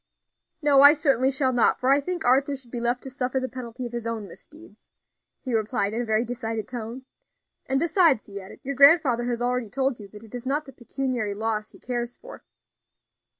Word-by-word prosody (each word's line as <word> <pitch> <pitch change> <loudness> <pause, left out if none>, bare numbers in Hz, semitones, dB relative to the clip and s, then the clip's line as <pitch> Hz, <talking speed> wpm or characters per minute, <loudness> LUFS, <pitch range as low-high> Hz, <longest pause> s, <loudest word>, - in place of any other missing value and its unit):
"No, 285 -2 +5
I 285 +1 +9
certainly 275 -5 +2
shall 265 -1 +1
not, 240 - +3
for 255 +1 +2
I 280 - +5
think 350 +2 -4
Arthur 270 +3 +3
should 255 -3 -12
be 240 - -4
left 240 +1 -1
to 265 - -7
suffer 260 0 -2
the 260 - -3
penalty 250 -1 -7
of 240 - -6
his 235 -1 -4
own 225 -3 -4
misdeeds," 300 - -16 0.5
he 255 - -4
replied 220 -1 0
in 235 - -1
a - - -3
very 220 +1 +1
decided 225 -3 -4
tone; 245 +1 -7 0.6
"and, 270 0 +1
besides," 330 - +3
he 200 -1 -8
added, 190 - -13
"your 280 - -3
grandfather 280 -3 +5
has 240 -1 -2
already 250 -2 -1
told 265 +2 -1
you 205 - -10
that 210 +2 -13
it 220 - -16
is 245 0 -6
not 295 +3 -1
the 270 - -12
pecuniary 245 -4 -3
loss 215 0 -2
he - - -17
cares 240 -1 -4
for." - - -13
250 Hz, 210 wpm, -25 LUFS, 230-270 Hz, 0.6 s, I